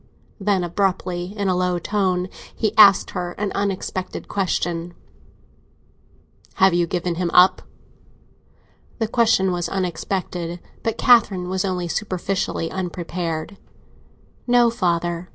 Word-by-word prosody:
Then, 195 Hz, -2 st, +1 dB
abruptly, 180 Hz, +1 st, -2 dB
in 200 Hz, -1 st, -1 dB
a 185 Hz, -, +2 dB
low 180 Hz, 0 st, 0 dB
tone, 185 Hz, -1 st, 0 dB, 0.3 s
he 215 Hz, -3 st, -1 dB
asked 200 Hz, -3 st, +7 dB
her 175 Hz, -1 st, -4 dB
an 205 Hz, 0 st, -3 dB
unexpected 190 Hz, -2 st, -3 dB
question: 175 Hz, -3 st, -2 dB, 1.6 s
"Have 190 Hz, -1 st, +4 dB
you 175 Hz, 0 st, +2 dB
given 175 Hz, 0 st, -2 dB
him 175 Hz, -, 0 dB
up?" 185 Hz, +1 st, +6 dB, 1.4 s
The 225 Hz, -, -1 dB
question 220 Hz, -5 st, +2 dB
was 175 Hz, -1 st, -2 dB
unexpected, 180 Hz, -1 st, -3 dB, 0.2 s
but 225 Hz, -2 st, -2 dB
Catherine 200 Hz, -7 st, +4 dB
was 185 Hz, 0 st, -1 dB
only 180 Hz, -3 st, -2 dB
superficially 185 Hz, -3 st, -2 dB
unprepared. 175 Hz, -1 st, -4 dB, 0.9 s
"No, 240 Hz, -1 st, +4 dB
father!" 175 Hz, -3 st, -1 dB
185 Hz, 115 wpm, -22 LUFS, 175-200 Hz, 1.6 s, asked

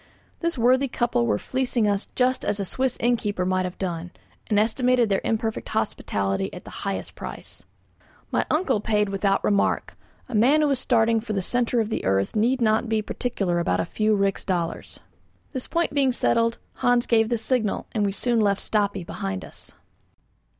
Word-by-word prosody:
This 335 Hz, -4 st, -1 dB
worthy 255 Hz, +3 st, +3 dB
couple 240 Hz, -, 0 dB
were 105 Hz, -, +2 dB
fleecing 250 Hz, -, 0 dB
us 200 Hz, 0 st, 0 dB
just 255 Hz, 0 st, +1 dB
as 205 Hz, -, -1 dB
a 200 Hz, -, -1 dB
Swiss 255 Hz, +6 st, -1 dB
innkeeper 210 Hz, -6 st, 0 dB
might 185 Hz, 0 st, +1 dB
have 180 Hz, -, -6 dB
done, 175 Hz, -2 st, -3 dB, 0.4 s
and 210 Hz, -2 st, +2 dB
estimated 245 Hz, +1 st, +2 dB
their 195 Hz, -, +1 dB
imperfect 220 Hz, 0 st, -2 dB
hospitality 100 Hz, -, -1 dB
at 180 Hz, -, -9 dB
the -, -, -10 dB
highest 195 Hz, -1 st, -3 dB
price. -, -, -9 dB, 0.7 s
My -, -, +2 dB
uncle 305 Hz, -, +1 dB
paid 210 Hz, -1 st, +1 dB
without 195 Hz, 0 st, +1 dB
a -, -, +1 dB
remark: 200 Hz, -1 st, +1 dB, 0.3 s
a 255 Hz, -, -9 dB
man 255 Hz, +8 st, +4 dB
who 300 Hz, -, +3 dB
is 270 Hz, -, +2 dB
starting 230 Hz, -3 st, +3 dB
for 220 Hz, -1 st, -5 dB
the 195 Hz, -, 0 dB
centre 245 Hz, +3 st, +1 dB
of 220 Hz, -1 st, -1 dB
the -, -, -2 dB
earth 95 Hz, -, 0 dB
need 240 Hz, +4 st, +2 dB
not 220 Hz, +1 st, +2 dB
be 220 Hz, -1 st, +1 dB
particular 195 Hz, -8 st, -1 dB
about 90 Hz, -, 0 dB
a 95 Hz, -, 0 dB
few 215 Hz, 0 st, +1 dB
rix 195 Hz, -1 st, 0 dB
dollars. 175 Hz, -3 st, -3 dB, 0.5 s
This 260 Hz, -3 st, -5 dB
point 340 Hz, -3 st, 0 dB
being 275 Hz, -2 st, +3 dB
settled, 230 Hz, -1 st, +1 dB, 0.2 s
Hans 245 Hz, -1 st, +2 dB
gave 225 Hz, -1 st, +3 dB
the 240 Hz, -, +1 dB
signal, 225 Hz, -2 st, -1 dB
and 215 Hz, -, 0 dB
we 200 Hz, -, +1 dB
soon 235 Hz, +3 st, 0 dB
left 200 Hz, -2 st, +2 dB
Stapi 205 Hz, -4 st, 0 dB
behind 95 Hz, -, -4 dB
us. -, -, -11 dB
220 Hz, 185 wpm, -24 LUFS, 195-245 Hz, 0.7 s, man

